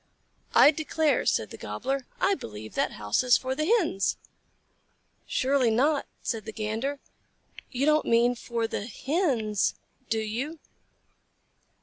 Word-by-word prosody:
"I 290 - +8
declare," 310 -2 0
said 110 - +1
the - - -9
Gobbler, 255 - -3
"I 395 - +3
believe 110 - -7
that - - 0
house 105 -1 0
is 250 -1 +5
for 260 0 -3
the 305 +3 -1
Hens!" 350 - +2 1.1
"Surely 260 -2 +2
not," 275 +6 +2 0.2
said 225 -3 -3
the - - -5
Gander. 225 +6 -3 0.7
"You 260 +2 -1
don't 305 0 +3
mean 235 +1 +4
for 235 -1 -3
the 215 -1 -4
Hens, 250 - 0 0.3
do 225 - +1
you?" 235 +9 -3
245 Hz, 130 wpm, -27 LUFS, 220-290 Hz, 1.1 s, I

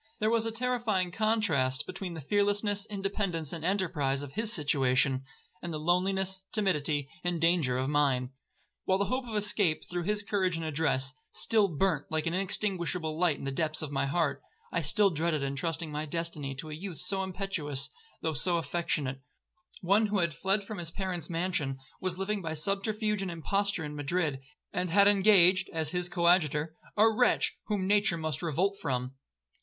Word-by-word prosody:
There 215 +1 +2
was 230 -1 +2
a - - -1
terrifying 225 -6 0
contrast 170 - +1
between 185 -1 -5
the 160 - -6
fearlessness, 205 +4 +1
independence, 195 -6 -2
and 165 -2 -5
enterprise 160 -8 0
of 140 - -8
his 220 +1 0
situation, 135 - +2 0.4
and 175 - -5
the 155 - -2
loneliness, 190 +3 +1
timidity, 150 -8 +1 0.2
and 175 -1 -1
danger 165 -7 +2
of 130 +1 -1
mine. 135 -3 +1 0.5
While 190 - +3
the 200 - +1
hope 255 +2 -2
of 220 - -5
escape, 205 -6 +2
through 175 -1 -4
his 210 +1 +1
courage 190 -4 0
and 165 0 -3
address, 145 -4 0 0.2
still 215 -3 +2
burnt 165 -2 0
like 155 -1 -1
an 165 - -1
inextinguishable 180 -4 -1
light 175 -5 +3
in - - -9
the 135 - -2
depth 155 +2 -1
of 150 - -4
my 140 0 0
heart, 155 +1 0 0.3
I 170 - 0
still 200 +6 +3
dreaded 160 -2 0
entrusting 155 +4 -2
my 150 +1 -3
destiny 155 -4 -3
to 155 +3 -7
a - - -5
youth 175 +1 -6
so 190 +5 -2
impetuous, 180 -8 -2 0.3
though 160 - 0
so 170 +5 +1
affectionate; 155 -5 -1 0.6
one 200 +4 +3
who 205 0 0
had 170 -3 +1
fled 195 +7 0
from 205 0 -7
his 170 -2 -3
parents' 180 -3 -4
mansion, 165 -6 -1 0.2
was 185 -1 -1
living 200 +1 -1
by 160 -2 -3
subterfuge 205 +5 0
and 195 - -2
imposture 195 +1 -1
in 150 0 -6
Madrid, 145 -1 -1 0.3
and 180 0 -1
had 200 +4 +6
engaged, 190 -2 +5
as 160 -2 -2
his 180 0 -2
coadjutor, 165 -3 +2 0.2
a 215 +2 +7
wretch 235 +3 +2
whom 205 -3 0
nature 205 -3 +3
must 155 -3 -2
revolt 185 +5 0
from. 125 -3 -2
175 Hz, 175 wpm, -30 LUFS, 150-200 Hz, 0.6 s, a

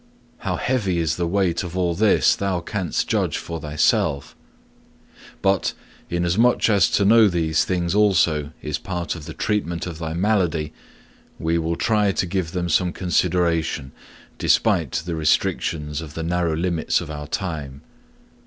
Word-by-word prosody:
How - - -2
heavy 105 -9 0
is 80 -2 0
the 85 -1 -1
weight 90 -2 +1
of 90 0 -6
all 90 -2 +1
this 105 +4 +3
thou 95 -3 -1
canst 90 -1 -2
judge - - 0
for 85 -2 -6
thyself. 75 - 0 1.1
But, 95 -2 +2 0.4
inasmuch 90 +8 +2
as 100 -4 +4
to 100 - +2
know 110 +1 +6
these 80 -4 +1
things 90 -2 -1
also 85 -8 +3
is 75 0 -3
part 90 -2 -3
of 80 -3 -9
the - - -8
treatment 85 -6 -1
of 85 -3 -7
thy 80 -1 -4
malady, 85 -6 0 0.6
we 80 +1 0
will 85 +1 -1
try 105 +1 +2
to - - 0
give 90 -2 -2
them 90 -1 -2
some 90 +2 +2
consideration, 85 -6 0 0.5
despite 80 - +2
the 85 - -3
restrictions 75 -1 0
of 75 -2 -9
the 80 - -3
narrow 85 -1 0
limits 85 -1 0
of - - -7
our 75 -1 -6
time. 75 -6 -4
85 Hz, 155 wpm, -22 LUFS, 80-95 Hz, 1.1 s, know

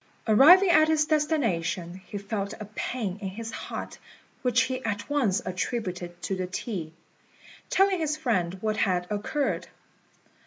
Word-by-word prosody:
Arriving 345 - +7
at 310 -1 +6
his 315 -1 +3
destination, 200 - 0
he 205 - -5
felt 200 0 -4
a 215 - -6
pain 210 -6 -3
in 195 - -3
his 225 +4 -6
heart, - - -6 0.4
which 250 -1 +3
he 260 0 -2
at 205 -2 -3
once 250 -7 +1
attributed 180 -3 -3
to 195 - -1
the 185 -1 -3
tea, 180 -4 -4 0.8
telling 390 -1 +3
his 305 -1 -1
friend 190 - 0
what 215 0 -1
had 180 -3 +1
occurred. 210 +8 -1
215 Hz, 145 wpm, -27 LUFS, 185-290 Hz, 0.8 s, Arriving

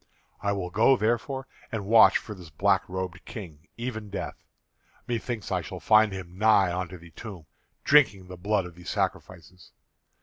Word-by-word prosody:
I 100 - 0
will 95 -3 -3
go, 115 +7 +4
therefore, 120 +4 -1 0.3
and 110 -4 -3
watch 110 +2 +7
for 105 - -8
this 90 -5 -12
black 95 +5 +1
robed 90 -2 -5
king, 80 -8 -10
even 115 -3 -5
Death. 100 - -6 0.6
Me 120 -1 -1
thinks 115 -3 -5
I - - +1
shall - - -7
find 110 -1 +5
him 95 -1 -8
nigh 100 -5 +4
unto 90 0 -4
the 85 -1 -15
tomb, 95 -5 -9 0.4
drinking 130 -10 +4
the 90 - -8
blood 100 +1 0
of 90 - -9
the 90 +1 -14
sacrifices. 90 0 -4
100 Hz, 170 wpm, -27 LUFS, 90-110 Hz, 0.6 s, watch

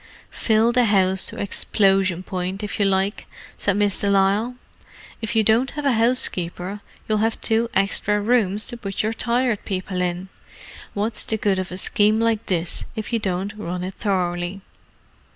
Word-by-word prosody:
"Fill 225 +1 +2
the 245 0 +3
house 190 -3 +2
to - - -5
explosion 195 -2 +1
point, 185 +2 -4
if 210 - -4
you 200 - +3
like," 195 +2 0 0.3
said 200 -1 0
Miss 205 -2 +1
de 200 - 0
Lisle. 200 +5 +2 0.7
"If 225 +1 -3
you 220 - +4
don't 225 +5 +3
have 295 - -3
a 275 - +4
housekeeper 205 -5 0 0.3
you'll 215 -1 +1
have 225 +1 0
two 230 +1 +1
extra 210 +1 +2
rooms 210 -2 +1
to 240 - -6
put 195 -3 -3
your 220 +1 0
Tired 235 -1 +1
People 185 -1 -3
in. 180 +1 -2 0.7
What's 210 +3 0
the 220 - -1
good 200 -3 +1
of 185 -1 -4
a 180 - -5
scheme 210 +3 +3
like 230 -1 0
this 170 -2 -1
if 220 +2 -5
you 230 - +2
don't 195 0 -2
run 180 -3 -4
it 185 +1 -4
thoroughly?" 180 -1 -2
205 Hz, 170 wpm, -22 LUFS, 190-220 Hz, 0.7 s, you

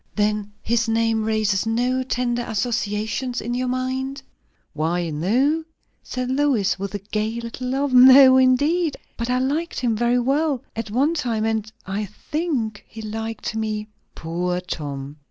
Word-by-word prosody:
"Then 210 0 0
his 230 0 +1
name 225 0 +1
raises 215 -2 +1
no 245 +3 +1
tender 245 -1 -1
associations 225 +2 -2
in 240 +2 -3
your 250 +1 -1
mind?" 260 +2 -2 0.5
"Why, 165 +2 -1
no!" 250 - +1 0.4
said 255 0 -4
Lois, 260 -9 +1
with 200 +1 -4
a 200 -1 -6
gay 220 +2 -1
little 235 +2 -6
laugh. 270 +2 0
"No, 260 +1 +9
indeed. 290 +6 +3 0.2
But 235 +1 -3
I 250 - +2
liked 290 +6 -1
him 235 -3 +1
very 240 +2 +2
well 275 +2 +1
at 225 -1 -4
one 270 +9 +2
time; 235 -8 -1
and 220 -1 -1
I 200 +3 -2
think 235 - -3
he 220 0 -9
liked 225 +1 -4
me." 215 -1 -2 0.3
"Poor 180 +2 -2
Tom!" 145 -5 -6
230 Hz, 150 wpm, -22 LUFS, 210-260 Hz, 0.5 s, No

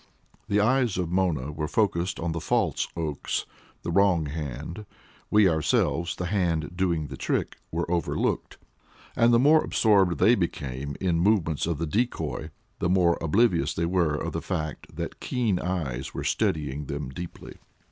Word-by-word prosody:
The 100 - +2
eyes 120 -1 +2
of 90 -2 -2
Mona 85 -7 0
were 75 0 -3
focused 90 -2 0
on 85 0 -2
the 85 0 -3
false - - +1
Oakes 75 -4 -2 0.4
the 85 - -2
wrong 90 -3 +3
hand; 75 - -6 0.4
we 105 -2 +5
ourselves 80 +1 +1
the 90 - -4
hand 90 -4 0
doing 85 -4 0
the - - -7
trick - - -2
were 85 +1 -1
over 85 -3 0
looked. - - -1 0.6
And 115 +1 +4
the 120 - +6
more 150 +5 +5
absorbed 95 -6 +3
they 105 +9 +5
became 70 - -2
in 90 -3 +1
the 100 - +5
movements 80 -8 +1
of 85 -3 -1
the 85 - -2
decoy, 115 +10 -2 0.3
the 85 - 0
more 90 -2 +4
oblivious 85 - +2
were 85 -2 +1
they - - -4
of - - -3
the - - -2
fact 75 -3 -4
that - - -5
keen 115 -8 0
eyes 70 -9 -3
were - - -3
studying 75 -2 -1
them 70 -2 -4
deeply. 85 +6 -9
85 Hz, 165 wpm, -26 LUFS, 75-95 Hz, 0.6 s, the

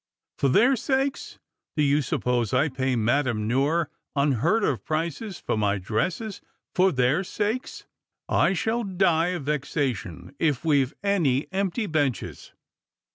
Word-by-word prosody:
" - - -65
For 140 - +3
their 240 - +5
sakes! 265 +2 -1 0.4
Do 150 - +3
you 145 +1 +3
suppose 125 -3 0
I 150 - +3
pay 130 -1 -1
Madame 115 -1 +1
Noire 145 +7 +1 0.3
\in 140 +1 +3
heard 170 - +1
of 135 - 0
prices 165 +5 -3
for - - -2
my 105 -1 +1
dresses 165 - -2 0.3
for 185 +1 +4
their 130 +5 +2
sakes? 215 +6 -3 0.4
I 190 - +3
shall 225 +6 0
die 180 -4 +2
of 180 -4 -3
vexation 135 - -3
if 150 -3 0
we've 140 -4 +2
any 160 -10 +2
empty 195 +3 -1
benches." 145 - -2
150 Hz, 140 wpm, -25 LUFS, 130-190 Hz, 0.4 s, their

